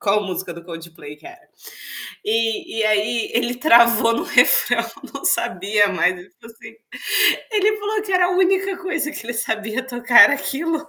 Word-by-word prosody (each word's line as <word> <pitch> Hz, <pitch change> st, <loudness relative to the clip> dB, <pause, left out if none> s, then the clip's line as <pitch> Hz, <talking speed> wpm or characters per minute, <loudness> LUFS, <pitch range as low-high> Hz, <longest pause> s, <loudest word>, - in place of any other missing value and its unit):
qual 210 Hz, 0 st, 0 dB
música 185 Hz, -2 st, -6 dB
do 170 Hz, 0 st, -13 dB
Coldplay 165 Hz, -3 st, -11 dB
que 150 Hz, -, -17 dB
era. 360 Hz, -1 st, -14 dB, 0.8 s
E 225 Hz, 0 st, -2 dB
e 220 Hz, -, +1 dB
aí 215 Hz, +2 st, 0 dB
ele 240 Hz, +1 st, -1 dB
travou 235 Hz, -3 st, +4 dB
no -, -, -3 dB
refrão, -, -, +3 dB, 0.3 s
não -, -, -8 dB
sabia 205 Hz, -, 0 dB
mais, 185 Hz, -1 st, 0 dB
tipo 180 Hz, +4 st, -19 dB
assim. 225 Hz, 0 st, -14 dB, 0.8 s
Ele 425 Hz, 0 st, +1 dB
falou 420 Hz, +1 st, -3 dB
que 410 Hz, -2 st, -7 dB
era 365 Hz, -1 st, +3 dB
a -, -, -1 dB
única 380 Hz, +1 st, 0 dB
coisa 330 Hz, -5 st, -4 dB
que 295 Hz, -6 st, -9 dB
ele 240 Hz, -, -4 dB
sabia 220 Hz, +1 st, -4 dB
tocar, 245 Hz, -1 st, +4 dB
era 215 Hz, -, +4 dB
aquilo. 305 Hz, +3 st, -4 dB
235 Hz, 170 wpm, -19 LUFS, 210-335 Hz, 0.8 s, travou